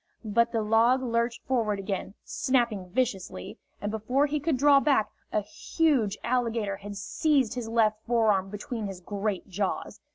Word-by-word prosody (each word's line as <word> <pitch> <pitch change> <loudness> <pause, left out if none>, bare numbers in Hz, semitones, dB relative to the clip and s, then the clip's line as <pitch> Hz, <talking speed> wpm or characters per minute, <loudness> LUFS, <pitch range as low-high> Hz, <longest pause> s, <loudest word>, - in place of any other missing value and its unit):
But 235 +2 +2
the 225 -2 0
log 230 +4 +3
lurched 235 -1 -1
forward 225 -5 0
again, 195 0 -4
snapping 235 -8 0
viciously, 195 - -2 0.2
and 205 - -3
before 250 +6 +1
he 295 +1 -1
could 295 -1 0
draw 280 +1 +6
back, 275 -7 +2 0.2
a 215 - +1
huge 230 -1 0
alligator 230 -5 0
had 205 0 -8
seized 270 +3 +1
his 245 -2 -4
left 220 -2 +2
forearm 215 -5 +2
between 210 +2 -5
his 195 -2 -7
great 200 +1 -3
jaws. 195 0 -3
225 Hz, 155 wpm, -28 LUFS, 205-250 Hz, 0.2 s, draw